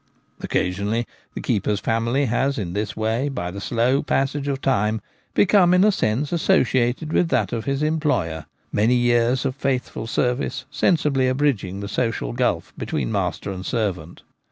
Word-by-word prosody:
Occasionally 100 +6 -1 0.3
the - - -4
keeper's 105 0 0
family 115 +6 0
has 135 +3 0
in 90 -5 -3
this 105 +2 -3
way 110 +6 0
by 90 -10 -4
the 100 +2 -7
slow 125 +6 +1
passage 140 0 -1
of 140 -1 -1
time 110 -5 +1 0.4
become 180 -3 +5
in 180 - +5
a 210 - +5
sense 140 - 0
associated 130 -2 +1
with 170 - +2
that 105 - +1
of 115 -2 -3
his 140 +1 -1
employer; 145 - 0 0.2
many 110 +4 +3
years 120 +1 +2
of 130 -1 -1
faithful 130 -5 -2
ser 125 +2 +1
vice 130 - -4
sensibly 145 -6 +2
abridging 130 -8 0
the 100 - -4
social 115 - -1
gulf - - -1
between 65 -4 -2
master - - -2
and 95 -1 -6
servant. 95 -8 -3
120 Hz, 160 wpm, -22 LUFS, 105-140 Hz, 0.4 s, become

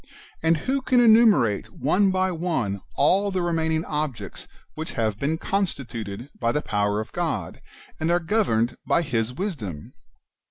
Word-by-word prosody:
And 165 0 +3
who 265 - -1
can 255 -1 +3
enumerate 215 - +5
one 190 +7 +2
by 185 0 +1
one 160 - -2
all 200 +2 +3
the 185 -2 -1
re 175 -1 0
maining 160 0 0
objects 140 -10 -4 0.3
which 160 +1 -6
have 110 -3 -1
been 155 +3 0
constituted 125 - -3
by 115 -1 +1
the 150 - -1
power 105 0 0
of 110 - -5
God, - - -3 0.4
and 160 - 0
are 175 +1 +3
governed 165 - +1
by 170 - +2
His 115 -5 -1
wisdom 125 - -5
160 Hz, 155 wpm, -24 LUFS, 115-185 Hz, 0.4 s, enumerate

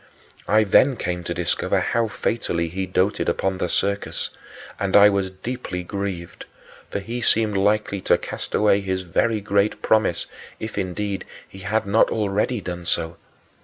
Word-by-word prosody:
I 110 +1 +5
then 125 +6 +4
came 90 -4 -3
to 85 - -2
discover 85 -1 0
how 115 -1 +1
fatally 85 -6 -1
he 95 +2 -3
doted 95 +2 +1
upon 95 -1 -1
the 90 - -1
circus, 100 +3 -1 0.5
and 100 0 +3
I 100 0 +8
was 100 -2 0
deeply 95 -2 -5
grieved, 95 -2 -5 0.4
for - - -3
he 115 +5 -4
seemed 110 -2 +2
likely 100 0 +1
to - - +6
cast - - -5
away 105 -1 +4
his 95 -1 -2
very 110 +5 +1
great 100 +1 +1
promise 110 -6 +2 0.3
if, 110 -1 -5
indeed, 100 0 -2 0.2
he 95 - -13
had 100 +3 -1
not 100 +3 +4
already 105 +2 0
done 90 -2 -5
so. 80 0 0
100 Hz, 160 wpm, -23 LUFS, 95-105 Hz, 0.5 s, I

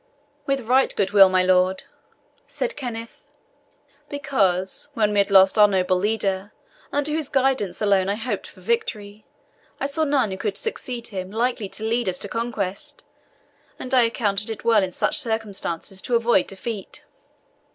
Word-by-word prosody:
"With 275 -1 0
right 255 +3 +3
good 195 -1 0
will, 195 -2 +8
my 185 0 +3
lord," 185 0 +2 0.6
said - - -3
Kenneth; 230 -4 -7 0.9
"because, 200 -8 0
when 215 -3 +2
we 205 - +2
had 200 - +2
lost 190 +1 +5
our 210 - +8
noble 185 -2 +1
leader, 200 -1 -1 0.4
under 290 +1 0
whose 310 -2 -1
guidance 260 -9 0
alone 195 -2 +3
I 200 - +1
hoped 230 +3 -4
for - - -16
victory, 215 - -3 0.5
I - - -1
saw 285 +3 -1
none 280 -8 +1
who 190 - -4
could 200 0 -2
succeed 250 - -3
him 185 -2 -5
likely 225 -1 -1
to 215 - -5
lead 230 -2 0
us 180 - -2
to 200 - -5
conquest, 210 -4 -4 0.7
and 255 - -4
I 255 - +6
accounted 215 -3 0
it 220 - -6
well 225 -3 +5
in 190 -1 -2
such - - +1
circumstances 200 -5 -3
to 245 - -1
avoid 230 -4 +3
defeat." 200 +1 -6
215 Hz, 160 wpm, -23 LUFS, 195-245 Hz, 0.9 s, will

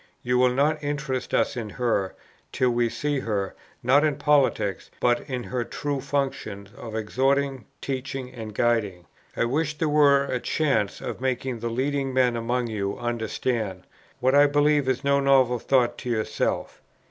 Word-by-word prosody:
You 125 0 +1
will 125 0 +5
not 150 +4 +1
interest 145 -3 -3
us - - +1
in 115 -3 -4
her, 105 -4 -1 0.4
till 125 -1 +2
we 120 -1 +1
see 145 +3 -1
her, 100 -5 -2 0.3
not 135 +5 +5
in 150 -2 +2
politics, 135 -11 +1
but 120 -1 +2
in 125 -2 -3
her 125 0 -2
true 140 +3 -3
functions 130 -8 -3
of 115 -5 -8
exhorting, 135 +3 0 0.2
teaching, 130 -1 -4
and 110 -4 -8
guiding. 105 -8 0 0.3
I - - +2
wish 150 +4 -1
there 160 - 0
were 145 -2 +5
a 130 -2 -2
chance 135 -8 0
of - - -5
making 130 -1 -1
the 115 +1 -3
leading 135 +2 -1
men 125 -2 +3
among 120 +2 -1
you 100 -3 -3
understand, 115 -4 -2 0.4
what 130 +1 +2
I 145 +1 +7
believe 145 -1 +2
is 130 +2 0
no 140 0 +3
novel 130 -3 +4
thought 120 -1 +2
to 125 - -5
yourself. 110 -2 -2
125 Hz, 165 wpm, -25 LUFS, 115-140 Hz, 0.4 s, I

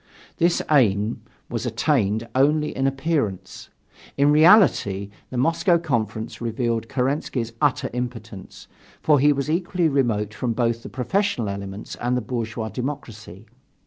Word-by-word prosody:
This 170 +1 +2
aim 110 -6 +2 0.3
was - - -3
attained 110 -6 0
only 150 +3 +2
in 135 0 +1
appearance. 135 - -2 0.5
In 140 +1 +4
reality, 150 - +4 0.2
the 130 - -5
Moscow 165 +6 +3
Conference 115 -7 -3
revealed 115 -1 -2
Kerensky's 130 -3 -2
utter 145 -4 +2
impotence, 115 -5 -7 0.4
for 150 -2 +4
he 145 +2 +5
was 140 -1 -1
equally 175 +1 0
remote 115 -8 0
from 120 +1 -2
both 115 0 0
the - - -9
professional 135 - -1
elements 100 +1 -6
and 125 +1 -1
the - - -1
bourgeois 115 -1 -4
democracy. 110 -5 -7
125 Hz, 130 wpm, -23 LUFS, 110-145 Hz, 0.5 s, he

